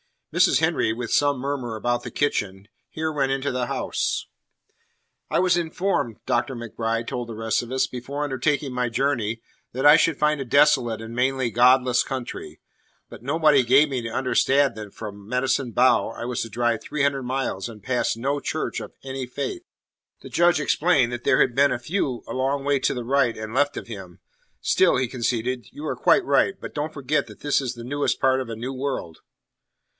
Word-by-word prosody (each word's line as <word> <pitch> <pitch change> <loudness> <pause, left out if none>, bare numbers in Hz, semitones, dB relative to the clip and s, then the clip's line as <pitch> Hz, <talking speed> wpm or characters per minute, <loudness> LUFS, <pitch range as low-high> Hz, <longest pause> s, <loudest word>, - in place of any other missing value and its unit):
Mrs. - - +4
Henry, 110 - +1
with 115 0 -5
some 145 -1 +3
murmur 130 -3 -3
about 120 +2 -1
the - - -6
kitchen, 100 -8 -2 0.2
here 160 0 -3
went 135 -3 0
into 135 +1 -1
the 125 -1 -2
house. - - -2 1.0
"I - - +1
was 180 -1 +3
informed," 170 - -1
Dr. 120 +2 0
MacBride 115 0 -3
held 120 -1 -4
the 115 - -7
rest 110 0 0
of 120 - -9
us, 130 0 +2
"before 135 +4 -5
undertaking 140 0 -1
my 125 0 0
journey 115 -3 -1 0.3
that 130 +3 -2
I 145 +2 +9
should 165 -3 +2
find 150 -1 +2
a 135 - -3
desolate 130 -4 +3
and 115 +1 -8
mainly 130 0 0
godless 125 +2 +4
country. 130 -3 -6 0.5
But - - -11
nobody 150 +1 +3
gave 135 +5 +5
me 130 -3 -2
to - - -3
understand 135 +3 +2
that 105 -2 -8
from 100 -2 -8
Medicine 125 +1 0
Bow 125 +3 +3
I 115 - -7
was 125 0 -2
to 115 - -4
drive 120 0 0
three 150 -2 -2
hundred 140 -1 +1
miles 125 -6 -2
and 105 -3 -12
pass 125 -1 0
no 135 +5 -1
church - - -3
of - - -9
any 135 -1 -5
faith." 140 - -4 0.6
The - - -10
Judge 175 -1 +3
explained 145 -5 +2
that 120 0 -6
there - - +4
had 125 - +3
been 140 +1 +4
a - - -1
few 130 -1 -2
a - - -6
long 135 +2 -1
way 140 0 +2
to - - +1
the 125 -2 -4
right 130 -2 +2
and 110 0 -6
left 145 +2 +2
of - - -6
him. 95 -6 -9 0.4
"Still," - - +3
he 125 -1 0
conceded, 120 -1 -2
"you 150 - -8
are 130 - -3
quite - - +4
right. 140 +8 +2
But - - -8
don't 150 +1 -3
forget 140 +1 -1
that - - -14
this 145 -1 +2
is 130 -3 -3
the 120 -1 -9
newest 145 +4 -1
part 130 -1 +3
of 130 -3 -5
a 115 - -4
new 125 +4 -5
world." 130 - -4
130 Hz, 200 wpm, -24 LUFS, 120-140 Hz, 1.0 s, I